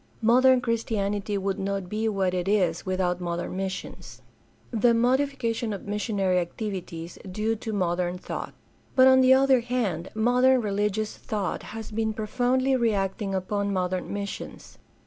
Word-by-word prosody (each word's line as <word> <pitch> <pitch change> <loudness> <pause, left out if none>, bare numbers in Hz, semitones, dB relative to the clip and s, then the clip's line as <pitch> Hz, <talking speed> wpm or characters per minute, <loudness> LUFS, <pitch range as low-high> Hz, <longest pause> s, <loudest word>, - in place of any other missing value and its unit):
Modern 255 +3 +5
Christianity 210 -3 -1
would 195 0 -2
not 195 -1 -2
be 215 +3 -1
what 190 -3 0
it 180 0 -2
is 185 -4 +1
without 185 -1 0
modern 175 +1 -3
missions. 190 0 -6 0.5
The 235 0 +3
modification 245 -2 +1
of 200 - -7
missionary 200 -3 0
activities 175 -2 -5
due 215 +4 0
to 220 - -5
modem 180 -2 -1
thought.— - - -6 0.4
But 260 -1 +7
on 260 0 +7
the 260 0 +7
other 265 -1 +4
hand 230 -8 -2
modern 250 +3 +4
religious 210 0 -1
thought 205 -4 -3 0.2
has 225 -1 -7
been 220 0 -1
profoundly 250 +5 +1
reacting 200 -4 0
upon 200 +2 -1
modem 185 -1 -2
missions. 200 0 -6
210 Hz, 140 wpm, -26 LUFS, 190-235 Hz, 0.5 s, But